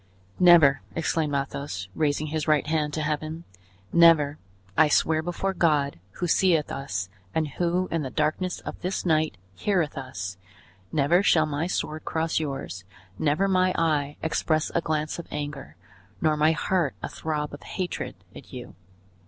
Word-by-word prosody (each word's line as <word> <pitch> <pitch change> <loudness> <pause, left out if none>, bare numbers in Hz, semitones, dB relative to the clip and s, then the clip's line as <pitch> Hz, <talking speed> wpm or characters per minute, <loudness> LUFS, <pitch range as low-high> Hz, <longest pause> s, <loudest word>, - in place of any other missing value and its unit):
"Never!" 165 -7 +7
exclaimed 160 -2 0
Athos, 135 -8 -3
raising 150 +2 0
his 155 0 -3
right 155 -2 +3
hand 150 -1 0
to 155 - -1
Heaven, 155 +2 -3 0.5
"never! 160 -4 +5 0.4
I 155 - +6
swear 155 +1 +3
before 175 +3 -2
God, 150 - +1
who 180 - -3
seeth 170 -2 +3
us, 95 -9 -3 0.3
and 160 -1 +1
who, 175 +4 0
in 165 - 0
the 135 - -3
darkness 155 +5 -1
of - - -7
this 185 +1 -2
night 155 - +2 0.2
heareth 165 - 0
us, 95 -8 -6 0.5
never 155 +5 +3
shall 160 -5 +4
my 150 +2 -2
sword 155 -3 -3
cross 160 0 0
yours, 135 - -4 0.4
never 155 +6 +2
my 185 -1 +2
eye 150 -3 +1
express 155 -1 0
a 170 - +2
glance 155 0 -2
of 170 - -7
anger, 145 - -6 0.4
nor 155 -2 +2
my 155 +2 +4
heart 165 -2 0
a - - -1
throb 150 -2 -3
of 145 - -8
hatred, 185 -2 -4 0.2
at - - -12
you. - - -8
155 Hz, 155 wpm, -26 LUFS, 145-165 Hz, 0.5 s, Never